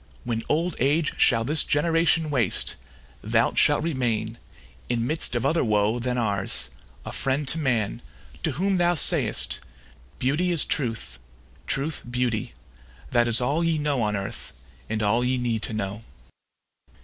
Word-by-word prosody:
When 115 -2 -2
old 165 +2 0
age 145 +4 +1
shall 115 -3 +4
this 150 +6 +3
generation 165 +1 +1
waste, 120 -9 +1 0.5
Thou - - +1
shalt - - +3
remain, 115 -7 -2 0.5
in 115 -1 0
midst 155 -2 +3
of 120 - -1
other 165 - +2
woe 105 +1 +1
Than 125 +1 -2
ours, 100 -5 +1 0.3
a - - -6
friend 135 +2 -1
to 165 - 0
man, 120 -6 -1 0.4
to 160 - -1
whom 190 +6 0
thou 175 0 +2
say'st, 150 - +3 0.6
"Beauty 150 +8 0
is 165 -4 +3
truth, 115 - -3 0.5
truth 145 +3 -2
beauty, 120 -3 -2 0.6
that 120 -1 +3
is 115 -1 +6
all 140 +7 0
Ye 165 -1 +1
know 145 -4 -1
on 105 -1 0
earth, 100 -1 -5 0.4
and 110 0 -2
all 115 +4 +2
ye 130 +1 +1
need 120 -3 -2
to 110 - -3
know." 105 +1 -4
125 Hz, 150 wpm, -24 LUFS, 115-155 Hz, 0.6 s, is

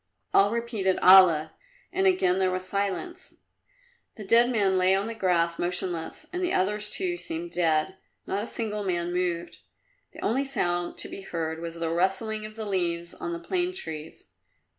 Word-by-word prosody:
All 200 +1 +5
repeated 225 -5 -1
"Allah!" 180 -5 +6 0.4
and 385 +1 +2
again 190 - +3
there 190 -1 +2
was 185 0 -1
silence. 205 - -3 0.8
The 215 - -8
dead 230 +5 +5
man 200 -6 +2
lay 185 +1 +4
on 195 +1 0
the 230 - -4
grass 170 -5 +1
motionless 175 -2 -2
and 360 - -2
the 360 -1 0
others, 210 +3 0
too, 355 - -1
seemed 335 0 -5
dead. 165 +2 +1 0.3
Not 200 - -2
a - - -6
single 210 -3 -3
man 175 -2 -1
moved. 175 -1 -2 0.5
The - - -11
only 265 +5 +1
sound 175 -10 -1
to - - -1
be - - -8
heard 165 -3 -4
was 170 0 -5
the 165 -1 -2
rustling 195 +5 0
of 215 - -14
the 220 -1 -5
leaves 170 -3 -2
on 340 - -5
the 340 - -3
plane 355 +1 -2
trees. 160 - -7
190 Hz, 175 wpm, -27 LUFS, 175-230 Hz, 0.8 s, Allah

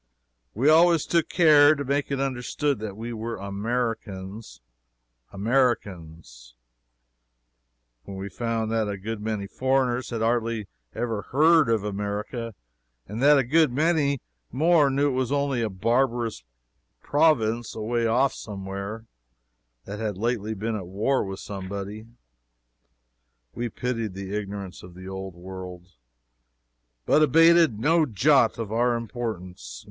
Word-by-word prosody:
We 125 +7 +1
always 165 0 +5
took 170 -2 +1
care 155 -3 +6
to 140 -1 -4
make 140 +2 -1
it 140 -1 -2
understood 135 +1 -1
that 105 -2 -6
we 115 +2 -5
were 115 +1 -4
Americans 105 0 -4 0.7
Americans! 90 - -2 1.5
When 95 - -8
we 95 +1 -5
found 115 +2 -2
that 110 -2 0
a 100 - -3
good 105 +2 -5
many 105 -2 -3
foreigners 130 +2 0
had 115 -2 -3
hardly 115 -1 0 0.3
ever 115 -3 -2
heard 155 0 +4
of 110 -3 +1
America, 105 +3 -4 0.5
and 105 +4 -5
that 145 +1 +6
a 135 - +3
good 155 +3 +3
many 145 -1 +1 0.3
more 155 +2 +4
knew 140 +2 +1
it 130 - -2
only 140 -3 0
as 115 - 0
a - - -5
barbarous 115 - 0 0.6
province 120 -7 +2
away 115 +2 -1
off 130 +4 +2
somewhere, 100 +2 -6 0.8
that 100 +1 -7
had 105 -4 -3
lately 110 0 -2
been 110 +2 -3
at 95 -5 -5
war 105 +9 0
with 95 -1 -6
somebody, 100 +2 -6 1.5
we 120 0 -3
pitied 115 -5 -3
the 100 +1 -5
ignorance 100 -2 -6
of 90 -1 -13
the 95 +1 -10
Old 95 -1 -6
World, 90 0 -9 1.2
but 155 - +4
abated 165 -3 +5
no 155 +7 +3
jot 120 +1 +3
of 115 -3 -5
our 120 +2 +2
importance. 95 - -6
115 Hz, 130 wpm, -25 LUFS, 100-135 Hz, 1.5 s, care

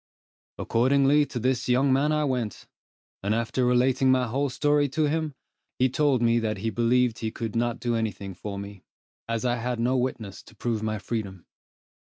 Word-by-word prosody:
Accordingly 140 +4 +3
to 125 - -6
this 125 +1 0
young 130 +2 +3
man 145 +3 +2
I 150 0 +1
went, 125 -7 -2 0.6
and 100 +2 0
after 115 +2 -1
relating 130 +2 +3
my 130 -1 +3
whole 135 +4 -1
story 145 +2 +2
to 155 +4 0
him, 155 -1 -2 0.4
he 130 +1 +3
told 135 -2 +2
me 115 0 +3
that 110 -2 -2
he 110 +3 -2
believed 120 0 +2
he 110 - -2
could 110 0 -5
not 120 0 0
do 120 -1 -1
any 110 -1 0
thing 100 -1 -8
for 100 +2 -6
me, 100 -1 -8 0.5
as 115 +1 -1
I 120 0 +1
had 120 0 -3
no 125 +3 +1
witnesses 125 -6 -3
to - - -17
prove 115 -3 -2
my 110 0 -2
freedom. 100 -4 -5
120 Hz, 190 wpm, -26 LUFS, 110-130 Hz, 0.6 s, Accordingly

